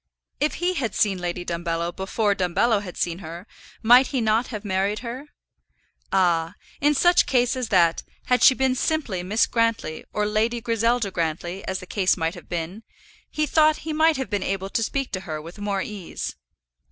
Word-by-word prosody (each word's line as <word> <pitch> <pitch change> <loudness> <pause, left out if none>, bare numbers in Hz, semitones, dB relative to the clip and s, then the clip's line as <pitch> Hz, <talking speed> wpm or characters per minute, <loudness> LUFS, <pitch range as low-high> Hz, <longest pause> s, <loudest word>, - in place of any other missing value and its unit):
If 300 - 0
he 355 +1 0
had 250 - -2
seen 195 -4 +2
Lady 175 0 -4
Dumbello 170 0 -2
before 200 +2 0
Dumbello 200 +4 +1
had 185 -3 -9
seen 170 0 -1
her, 170 +1 -8 0.4
might 245 +3 +7
he 270 - -1
not 225 +1 +2
have 215 -3 -7
married 200 +2 0
her? 255 +5 -6 0.8
Ah! 175 -2 +2 0.2
in 295 +1 +3
such 350 +5 +4
case 245 -1 +2
as 250 -3 -3
that, 170 -4 +3 0.2
had 250 0 +2
she 260 - +7
been 265 0 +2
simply 255 - -1
Miss 205 +5 +2
Grantly, 230 -9 -1
or 210 - 0
Lady 220 +3 0
Griselda 230 -1 0
Grantly, 170 +3 -3
as 190 0 -2
the - - -9
case 190 0 +1
might 165 -1 -1
have 175 - -13
been, 175 +4 -4 0.5
he 305 - 0
thought 310 0 +3
he 315 - -2
might 315 0 +3
have 265 -3 -4
been 205 -2 0
able 195 0 -3
to - - 0
speak 270 +4 -2
to 185 - -2
her 160 -4 -5
with 170 +6 -11
more 200 -2 -1
ease. 200 -5 -6
205 Hz, 190 wpm, -24 LUFS, 180-245 Hz, 0.8 s, might